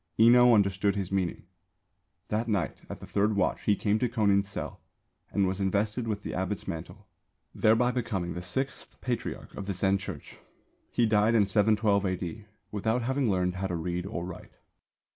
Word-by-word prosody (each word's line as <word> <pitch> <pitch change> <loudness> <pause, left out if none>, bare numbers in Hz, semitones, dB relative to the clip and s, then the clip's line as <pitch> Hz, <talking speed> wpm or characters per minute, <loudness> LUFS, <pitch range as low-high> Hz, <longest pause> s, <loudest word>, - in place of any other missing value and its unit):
Enō 120 +1 +7
understood 100 -1 +2
his 95 -2 -3
meaning. 95 -3 -1 0.9
That 110 +2 -1
night 100 -6 -1
at - - -6
the - - -9
third 105 +1 +1
watch 95 -2 +1
he 105 - +4
came 105 +1 +1
to 125 - +1
Kōnin's 100 -4 +2
cell - - -6 0.5
and 100 - +1
was 95 +1 -2
invested 105 +4 0
with 105 -2 -3
the - - -5
abbot's 95 +2 -3
mantle, 90 +5 -7 0.5
thereby 115 +3 +3
becoming 105 -8 -2
the 90 - -5
Sixth 135 +9 -4
Patriarch 125 -2 -4
of 100 - -7
the 100 - -1
Zen 95 +2 +2
Church. 95 -6 -8 0.5
He 120 - +2
died 110 +1 +3
in 105 -3 +5
712 105 0 +3
A.D., 95 +2 -3 0.3
without 110 +4 0
having 130 0 +1
learned 90 -1 0
how 95 +1 -1
to 90 - -3
read 90 +2 -3
or 90 -4 -4
write. 90 -2 -9
100 Hz, 175 wpm, -28 LUFS, 95-110 Hz, 0.9 s, Enō